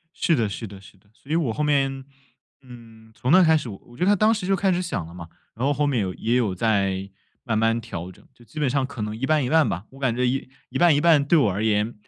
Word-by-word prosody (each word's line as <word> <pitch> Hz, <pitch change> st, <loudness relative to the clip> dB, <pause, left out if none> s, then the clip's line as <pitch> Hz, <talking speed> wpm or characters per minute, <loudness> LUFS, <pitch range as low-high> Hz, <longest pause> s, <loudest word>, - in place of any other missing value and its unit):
是 170 Hz, -, +1 dB
的 115 Hz, -8 st, +1 dB
是 105 Hz, +3 st, -6 dB
的 100 Hz, -1 st, -11 dB
是 100 Hz, 0 st, -17 dB
的， 100 Hz, +2 st, -30 dB
所 140 Hz, -, -22 dB
以 160 Hz, -, +1 dB
我 140 Hz, -10 st, 0 dB
后 -, -, -3 dB
面， 135 Hz, -2 st, 0 dB, 0.6 s
嗯， 115 Hz, -3 st, -15 dB
从 125 Hz, +4 st, -2 dB
那 185 Hz, 0 st, +7 dB
开 160 Hz, -1 st, +5 dB
始 130 Hz, -, -5 dB
我 115 Hz, +4 st, -12 dB
觉 180 Hz, -, 0 dB
得 205 Hz, +2 st, +4 dB
当 215 Hz, +3 st, +3 dB
时 210 Hz, -5 st, -4 dB
就 195 Hz, -, +3 dB
开 190 Hz, 0 st, +1 dB
始 180 Hz, 0 st, 0 dB
想 165 Hz, -, -4 dB
了 85 Hz, -, -12 dB
嘛， 85 Hz, -2 st, -9 dB, 0.3 s
然 120 Hz, +4 st, -3 dB
后 145 Hz, -, +2 dB
后 145 Hz, +1 st, 0 dB
面 135 Hz, -5 st, 0 dB
有 95 Hz, -1 st, -3 dB
也 115 Hz, +2 st, -1 dB
有 105 Hz, -7 st, 0 dB
在 100 Hz, -2 st, 0 dB, 0.3 s
慢 115 Hz, -3 st, -1 dB
慢 115 Hz, +1 st, +2 dB
调 90 Hz, -6 st, -7 dB
整。 -, -, -20 dB
就 120 Hz, -, -20 dB
基 120 Hz, -, -16 dB
本 150 Hz, -3 st, +1 dB
上 135 Hz, +1 st, 0 dB
可 130 Hz, -3 st, -8 dB
能 105 Hz, 0 st, -3 dB
一 125 Hz, -, -3 dB
半 155 Hz, -1 st, +2 dB
一 125 Hz, -, -2 dB
半 160 Hz, -1 st, +4 dB
吧， 90 Hz, +5 st, -4 dB
我 135 Hz, -, -15 dB
感 125 Hz, -4 st, 0 dB
觉 125 Hz, -, 0 dB
一 130 Hz, +2 st, -1 dB, 0.2 s
一 130 Hz, -, -4 dB
半 170 Hz, -2 st, +5 dB
一 145 Hz, -, +1 dB
半 160 Hz, -3 st, +5 dB
对 165 Hz, +3 st, +4 dB
我 110 Hz, -9 st, +3 dB
而 100 Hz, +4 st, -3 dB
言， 110 Hz, +1 st, +1 dB
125 Hz, 310 characters per minute, -23 LUFS, 110-150 Hz, 0.6 s, 那